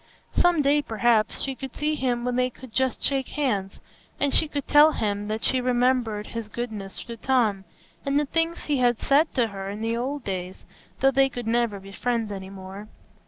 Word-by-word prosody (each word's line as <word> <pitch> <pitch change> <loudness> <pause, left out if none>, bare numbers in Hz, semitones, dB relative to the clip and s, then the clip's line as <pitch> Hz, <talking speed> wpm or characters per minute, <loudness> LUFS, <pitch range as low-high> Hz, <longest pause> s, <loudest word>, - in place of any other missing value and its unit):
Some 350 -4 +3
day, 290 +1 +4
perhaps, 225 -3 +1
she 270 - -1
could 265 -1 -8
see 300 +1 0
him 250 -4 -1
when 250 0 0
they 250 0 +2
could 255 -1 -13
just 260 0 0
shake 270 -2 +1
hands, 205 -10 -1 0.4
and 285 -1 +1
she 315 - +4
could 285 -2 -4
tell 300 +1 +7
him 205 -1 -1
that 215 +1 -3
she 260 -1 +2
remembered 245 -4 +1
his 230 -2 -4
goodness 215 -5 -5
to 235 - -7
Tom, 220 -6 +1 0.4
and 280 +1 +2
the 295 - +1
things 330 +3 -1
he 290 -2 0
had 245 -2 +2
said 295 +4 +3
to 235 -3 +2
her 195 -1 -6
in 205 +2 -6
the 225 +1 0
old 265 +3 -3
days, 185 -2 -5 0.4
though 270 0 +5
they 270 0 +4
could 245 -2 -6
never 230 -3 +1
be 195 +1 -12
friends 230 0 -1
any 190 -1 -6
more. 195 +2 -9
245 Hz, 205 wpm, -25 LUFS, 210-270 Hz, 0.4 s, tell